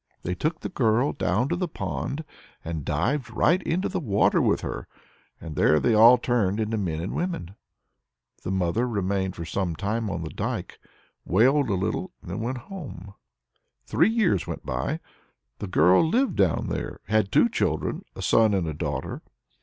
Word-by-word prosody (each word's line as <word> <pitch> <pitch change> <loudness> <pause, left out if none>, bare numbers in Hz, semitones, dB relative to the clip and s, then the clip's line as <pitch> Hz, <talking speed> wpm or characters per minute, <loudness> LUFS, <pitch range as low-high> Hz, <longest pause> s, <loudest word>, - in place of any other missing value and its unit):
They 90 - -2
took 155 - -2
the - - -4
girl 120 -3 +2
down 95 +10 0
to 175 - +1
the 180 0 -1
pond, 95 - -4 0.4
and 80 -2 -4
dived 125 - -1
right 170 - +2
into 180 +2 -1
the - - -2
water 105 - +2
with - - +2
her. - - -5 0.5
And 80 -2 -8
there 75 - +4
they 120 - +2
all 115 +3 +8
turned 115 -5 0
into 110 0 -1
men 85 -7 -2
and 90 - -4
women. 165 - -3 0.9
The - - -5
mother 95 +5 0
remained 95 -4 -1
for 85 - -6
some 85 +1 -2
time 110 +4 -2
on 85 -3 -3
the 80 - -6
dike, - - -4 0.4
wailed 130 - +3
a 100 - +1
little, 105 - -2
and 90 - -8
then 95 - -3
went 120 +4 -2
home. 120 - -9 0.7
Three 175 - +3
years 210 - +1
went - - -6
by. 65 0 -2 0.6
The 105 - -4
girl 90 - +5
lived 245 +12 +1
down 95 -6 +1
there, - - -4
and 105 - -5
had 100 -2 +1
two - - +5
children, - - -1
a - - -6
son 110 -3 +4
and 95 -3 0
a 80 - -2
daughter. 75 -4 -4
105 Hz, 180 wpm, -25 LUFS, 90-130 Hz, 0.9 s, all